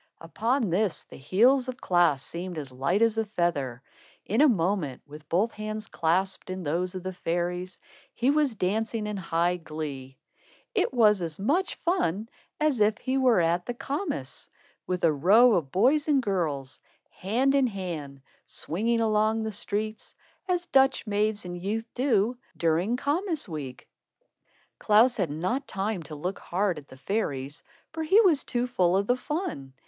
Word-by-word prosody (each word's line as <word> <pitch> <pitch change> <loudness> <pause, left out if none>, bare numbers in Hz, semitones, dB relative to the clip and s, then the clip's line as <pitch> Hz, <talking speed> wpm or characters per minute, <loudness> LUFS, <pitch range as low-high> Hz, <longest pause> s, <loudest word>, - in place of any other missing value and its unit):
Upon 225 +6 -1
this, 195 0 0
the - - -14
heels 245 - +3
of 255 - -5
Klaas 175 -7 +2
seemed 175 +2 -6
as 140 -4 -5
light 140 - +1
as 225 -1 +2
a - - +2
feather. 145 - -1 0.4
In 220 +7 +1
a 305 - +7
moment, 175 - 0
with 150 +1 -13
both 200 +7 +2
hands 215 0 -5
clasped 185 +4 -1
in 185 0 -4
those 175 +5 -1
of 185 - -5
the 185 0 -4
fairies, 180 +1 -3 0.4
he 250 +3 +2
was 290 -5 +1
dancing 215 +3 -1
in 210 0 -3
high 175 -1 0
glee. 150 -5 -7 0.6
It 410 -5 +1
was 215 -6 +4
as 165 -3 -4
much 300 - 0
fun 225 - -1 0.3
as 300 -5 +1
if 210 +1 +3
he 260 0 -2
were 250 -6 +4
at 170 +1 +1
the 245 - -3
kermiss, 275 - -4 0.4
with 180 -1 -2
a 165 -2 +4
row 210 - +6
of 155 -8 0
boys 280 - +3
and 290 -3 +4
girls, 160 - -2 0.3
hand 245 +8 0
in 275 -2 +4
hand, 165 - -6 0.2
swinging 230 +8 -1
along 220 0 +2
the 220 - -3
streets, 215 +1 -4 0.3
as 355 -1 0
Dutch 270 -5 +3
maids 210 -1 0
and 175 0 -5
youth 220 +4 -2
do, 240 -2 +1 0.2
during 170 +8 +1
kermiss 315 - -1
week. 145 -7 -7 0.9
Klaas 230 +4 +4
had 185 -7 0
not 185 - -2
time 195 0 -2
to 155 -1 -9
look 180 +6 -4
hard 185 -2 -1
at 145 - -17
the 130 - -14
fairies, 145 -5 -3 0.3
for 320 - -4
he 360 +7 +5
was 340 -9 +3
too 245 0 -1
full 185 -7 +2
of 200 - +1
the 245 - +2
fun. 255 - -4
200 Hz, 165 wpm, -27 LUFS, 170-240 Hz, 0.9 s, a